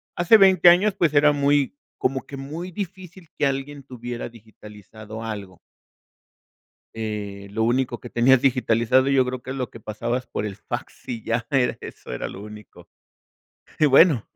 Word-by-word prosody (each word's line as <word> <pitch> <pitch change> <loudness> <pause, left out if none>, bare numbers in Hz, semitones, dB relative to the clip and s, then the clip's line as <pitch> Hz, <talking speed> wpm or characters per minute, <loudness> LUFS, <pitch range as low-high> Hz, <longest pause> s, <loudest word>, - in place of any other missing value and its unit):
hace 175 +6 +6
20 190 -3 +7
años, 190 +4 +4
pues 170 -6 +1
era 150 0 +5
muy, 145 -1 +1 0.2
como 135 +1 -1
que 140 - -8
muy 160 +7 -6
difícil 185 -2 -8
que - - +1
alguien 135 +1 -4
tuviera 120 -2 -7
digitalizado 110 -1 -12
algo. 100 -5 -7 1.4
Eh, 105 -3 -5
lo 110 +2 -1
único 120 +1 0
que 120 - -9
tenías 125 +2 +4
digitalizado 125 -1 +2
yo 135 -2 +3
creo 125 0 -4
que 130 - -7
es 135 - -4
lo 125 -4 -3
que 115 - -12
pasabas 120 +4 -4
por 105 - -4
el 100 -2 -6
fax - - -7
y 115 -3 -5
ya 115 +1 -2
era 135 -4 +1
eso, - - -10
era - - -4
lo 100 - -9
único. 105 -1 -13 0.9
Y 155 - +5
bueno, 140 - +5
125 Hz, 165 wpm, -23 LUFS, 110-145 Hz, 1.4 s, 20